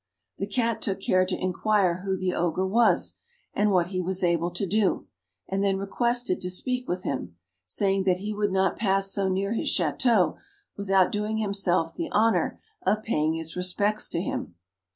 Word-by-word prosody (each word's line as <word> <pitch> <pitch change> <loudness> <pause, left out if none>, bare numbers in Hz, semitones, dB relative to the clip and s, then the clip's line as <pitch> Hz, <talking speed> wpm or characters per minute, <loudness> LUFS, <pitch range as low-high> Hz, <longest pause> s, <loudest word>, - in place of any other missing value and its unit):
The 195 - -2
Cat 230 +1 -1
took 195 -2 -1
care 185 -1 +2
to 185 - -2
inquire 185 -1 +1
who 190 -1 -1
the 185 -1 -1
Ogre 175 +2 0
was, 230 +5 +3 0.4
and 210 0 +2
what 180 -3 +2
he 185 -1 -2
was 185 +1 -1
able 170 -1 +2
to 180 +3 -3
do; 205 +2 +1 0.4
and 195 +1 -1
then 195 -1 +2
requested 235 +2 0
to 180 - -2
speak 250 +7 -1
with 180 +1 -2
him, 90 -11 -4 0.3
saying 195 - 0
that 185 -2 +3
he 205 +3 -4
would 205 -1 0
not 190 -1 +1
pass 195 -2 +2
so 195 -1 0
near 195 +3 -1
his 230 - -1
Château 190 - +2 0.4
without 195 -2 +2
doing 210 +1 -2
himself 195 -6 +1
the 325 -3 -5
honour 225 +2 +2 0.2
of 215 +1 0
paying 155 -7 0
his 165 0 -5
respects 200 +4 0
to 170 - -1
him. 170 - -4
195 Hz, 180 wpm, -26 LUFS, 180-210 Hz, 0.4 s, was